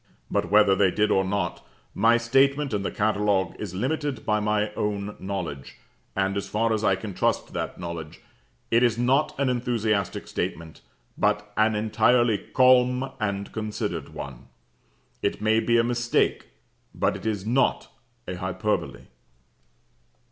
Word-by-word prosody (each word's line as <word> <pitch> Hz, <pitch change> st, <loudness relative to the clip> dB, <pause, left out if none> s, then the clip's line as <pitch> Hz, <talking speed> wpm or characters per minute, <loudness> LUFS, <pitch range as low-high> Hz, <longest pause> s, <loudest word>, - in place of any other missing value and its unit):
But -, -, 0 dB
whether 105 Hz, -1 st, +5 dB
they 95 Hz, 0 st, +4 dB
did 105 Hz, +3 st, +1 dB
or 95 Hz, -, +3 dB
not, 100 Hz, +2 st, -2 dB, 0.3 s
my 115 Hz, +1 st, +4 dB
statement 135 Hz, +3 st, +2 dB
in 105 Hz, -, 0 dB
the 100 Hz, -, -2 dB
catalogue 105 Hz, -2 st, 0 dB
is 100 Hz, -4 st, -5 dB
limited 140 Hz, +3 st, -2 dB
by 105 Hz, 0 st, +2 dB
my 105 Hz, 0 st, 0 dB
own 105 Hz, -1 st, -3 dB
knowledge: 95 Hz, -8 st, -5 dB, 0.4 s
and, 95 Hz, 0 st, 0 dB
as 100 Hz, -, -3 dB
far 115 Hz, +1 st, +1 dB
as 110 Hz, -1 st, -1 dB
I 95 Hz, -3 st, +3 dB
can 100 Hz, +1 st, -7 dB
trust -, -, -1 dB
that -, -, -4 dB
knowledge, 85 Hz, -3 st, -6 dB, 0.5 s
it 115 Hz, +1 st, +4 dB
is 120 Hz, -2 st, +3 dB
not 130 Hz, +4 st, +1 dB
an 140 Hz, -, +2 dB
enthusiastic 115 Hz, -5 st, -1 dB
statement, 80 Hz, -1 st, -4 dB, 0.4 s
but 105 Hz, 0 st, 0 dB
an 110 Hz, 0 st, +3 dB
entirely 110 Hz, +1 st, +3 dB
calm 125 Hz, +2 st, +3 dB
and 100 Hz, -2 st, -2 dB
considered 105 Hz, -, -4 dB
one. 65 Hz, -2 st, -9 dB, 0.7 s
It -, -, -1 dB
may 110 Hz, +1 st, +3 dB
be 120 Hz, +1 st, +2 dB
a 115 Hz, -, +4 dB
mistake 120 Hz, 0 st, 0 dB, 0.5 s
but -, -, +1 dB
it -, -, -6 dB
is 105 Hz, -3 st, -2 dB
not 125 Hz, +5 st, +1 dB, 0.4 s
a 90 Hz, -, -4 dB
hyperbole." 95 Hz, +3 st, -2 dB
105 Hz, 150 wpm, -25 LUFS, 100-120 Hz, 0.7 s, whether